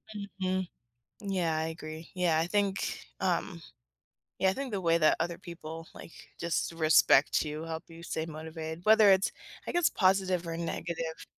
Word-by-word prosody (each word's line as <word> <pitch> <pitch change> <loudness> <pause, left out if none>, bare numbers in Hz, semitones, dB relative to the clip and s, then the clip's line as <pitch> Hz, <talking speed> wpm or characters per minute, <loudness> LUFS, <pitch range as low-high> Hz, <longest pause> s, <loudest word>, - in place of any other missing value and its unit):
Mhm, 190 -2 -2 0.5
yeah, 185 -6 0
I 160 - 0
agree, 160 0 -8
yeah, 175 -3 +2
I 165 - +1
think, 200 +1 -1
um 175 -1 -1 0.8
yeah, 190 - +3
I 190 - +1
think 270 -1 -5
the 200 - -2
way 165 -1 +3
that 155 -2 +4
other 170 0 -2
people, 165 -2 -8
like - - -11 0.3
just, 170 0 -1
respect 155 -3 +5
you, 155 0 -5
help 165 0 -5
you 165 0 -12
stay 160 -1 -3
motivated, 160 +1 -7
whether 215 -1 +7
it's, 190 0 +3 0.4
I - - -1
guess 350 -2 +3
positive 185 -2 +2
or 165 0 -3
negative. 165 -1 -4
170 Hz, 165 wpm, -30 LUFS, 160-190 Hz, 0.8 s, whether